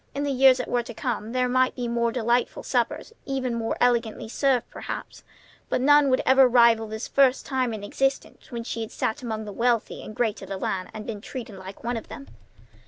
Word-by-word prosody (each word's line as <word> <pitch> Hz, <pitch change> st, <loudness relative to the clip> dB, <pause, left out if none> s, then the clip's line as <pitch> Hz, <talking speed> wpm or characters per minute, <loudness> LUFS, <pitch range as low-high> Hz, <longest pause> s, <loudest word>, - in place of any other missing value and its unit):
In 285 Hz, -, -1 dB
the 285 Hz, -, 0 dB
years 265 Hz, -1 st, +6 dB
that 250 Hz, -, -4 dB
were 245 Hz, -, +1 dB
to 235 Hz, -1 st, -9 dB
come 225 Hz, -3 st, -3 dB
there 250 Hz, 0 st, +1 dB
might 255 Hz, +1 st, +2 dB
be 250 Hz, -, -4 dB
many 240 Hz, -, -2 dB
more 235 Hz, 0 st, +1 dB
delightful 240 Hz, 0 st, 0 dB
suppers, -, -, -1 dB
even 265 Hz, -3 st, -1 dB
more 230 Hz, -1 st, -2 dB
elegantly 235 Hz, -3 st, +1 dB
served, 255 Hz, +1 st, +1 dB
perhaps; -, -, -7 dB, 0.5 s
but -, -, +1 dB
none 290 Hz, +2 st, +5 dB
would 255 Hz, -, +2 dB
ever 265 Hz, 0 st, +6 dB
rival 235 Hz, -2 st, +5 dB
this 220 Hz, +2 st, -5 dB
first 270 Hz, -1 st, +3 dB
time 260 Hz, -3 st, 0 dB
in 215 Hz, -2 st, -5 dB
her -, -, -6 dB
existence 270 Hz, +6 st, -2 dB
when 235 Hz, -1 st, -4 dB
she 230 Hz, -1 st, -4 dB
had 220 Hz, -, -5 dB
sat 220 Hz, +6 st, -2 dB
among 220 Hz, -3 st, -4 dB
the 205 Hz, -, -7 dB
wealthy 235 Hz, 0 st, 0 dB
and 215 Hz, -, -9 dB
great 230 Hz, -4 st, -1 dB
of 195 Hz, -, -9 dB
the 195 Hz, -, -3 dB
land 185 Hz, -1 st, -3 dB
and 215 Hz, -1 st, -8 dB
been 215 Hz, -3 st, -5 dB
treated 230 Hz, -3 st, -7 dB
like 190 Hz, +2 st, -10 dB
one 240 Hz, 0 st, -1 dB
of 225 Hz, -, -8 dB
them. 140 Hz, -, -10 dB
240 Hz, 230 wpm, -25 LUFS, 220-255 Hz, 0.5 s, years